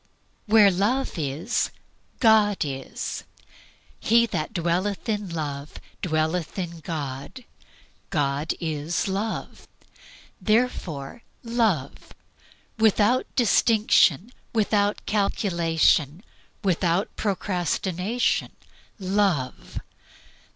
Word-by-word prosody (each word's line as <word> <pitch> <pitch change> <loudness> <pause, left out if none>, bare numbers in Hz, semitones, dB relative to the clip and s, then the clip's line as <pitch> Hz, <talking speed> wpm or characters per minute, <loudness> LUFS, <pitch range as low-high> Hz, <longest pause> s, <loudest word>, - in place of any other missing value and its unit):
Where 210 -2 +6
Love 210 +4 0
is, 150 - -1 0.5
God 215 -3 +4
is. 135 -2 -5 0.8
He 235 +1 +4
that 170 -7 -3
dwelleth 185 +1 -1
in 210 -3 -2
Love 150 -3 -5 0.2
dwelleth 160 +1 -1
in 170 -3 -4
God. 150 - -6 0.6
God 145 -2 0
is 160 +1 -2
Love. 200 +3 -4 0.7
Therefore 215 - -1 0.2
love. 220 - -1 0.7
Without 220 +3 +3
distinction, 220 - +3 0.2
without 205 -2 +1
calculation, 170 -5 +1 0.4
without 180 0 +1
procrastination, 190 +2 -1 0.4
love. 190 - -1
185 Hz, 75 wpm, -25 LUFS, 160-215 Hz, 0.8 s, Where